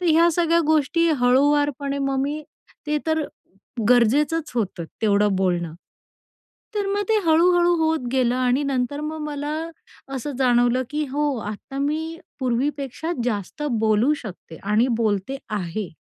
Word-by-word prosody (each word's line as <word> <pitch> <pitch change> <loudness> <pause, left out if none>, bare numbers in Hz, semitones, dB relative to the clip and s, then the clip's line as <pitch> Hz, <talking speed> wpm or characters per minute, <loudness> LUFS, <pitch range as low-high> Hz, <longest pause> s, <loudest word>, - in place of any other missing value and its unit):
तर 360 - -1
ह्या 330 +1 +5
सगळ्या 335 0 +3
गोष्टी 315 +2 +2
हळुवारपणे 280 +2 +2
मग 275 -1 0
मी, 295 +2 -3 0.4
ते 300 0 +1
तर 315 -1 +1 0.7
गरजेचंच 285 +7 +3
होतं 190 -7 -2 0.2
तेवढं 205 -2 +3
बोलणं. 175 -3 0 1.0
तर 410 -1 0
मग 405 +1 0
ते - - +4
हळू-हळू 345 +2 +4
होत 320 -5 0
गेलं 250 -2 +2
आणि 255 +2 +1
नंतर 275 +1 -1
मग 310 +1 -4
मला 295 -1 -4 0.7
असं 270 +3 -4
जाणवलं, 245 0 +3
की 300 +1 -1
"हो, 290 0 0
आत्ता 215 +6 -7
मी 315 +3 -2 0.2
पूर्वीपेक्षा 275 +4 -2
जास्त 210 +4 -3 0.2
बोलू 220 +6 +3
शकते 180 -6 -9
आणि 210 +5 +2
बोलते 215 +4 0
आहे." 200 -1 -3
275 Hz, 135 wpm, -23 LUFS, 235-305 Hz, 1.0 s, ह्या